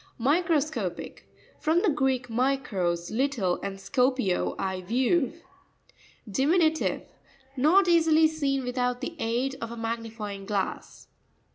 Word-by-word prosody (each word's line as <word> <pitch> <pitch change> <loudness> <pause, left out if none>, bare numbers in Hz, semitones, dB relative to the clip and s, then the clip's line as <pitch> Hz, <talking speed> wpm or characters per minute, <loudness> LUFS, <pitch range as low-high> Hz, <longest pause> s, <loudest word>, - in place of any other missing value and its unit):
Microsco'pic.—From 315 +2 -1
the 410 - +4
Greek, 265 -4 0
mi 255 +4 +1
kros, 175 -9 -2
little, 240 -9 0
and 195 -1 -5
skoped, 250 -3 0
I 190 -1 -2
view. 255 - +1 0.9
Di 265 +7 0
minutive. 320 -2 +2 0.5
Not 330 +9 +4
easily 325 -2 +5
seen 280 -4 -1
with 250 +1 -3
out 245 0 0
the 335 - -5
aid 250 +4 -1
of 230 - -4
a 235 - -7
magnifying 225 -3 -5
glass. 200 -3 -3
255 Hz, 120 wpm, -27 LUFS, 225-305 Hz, 0.9 s, easily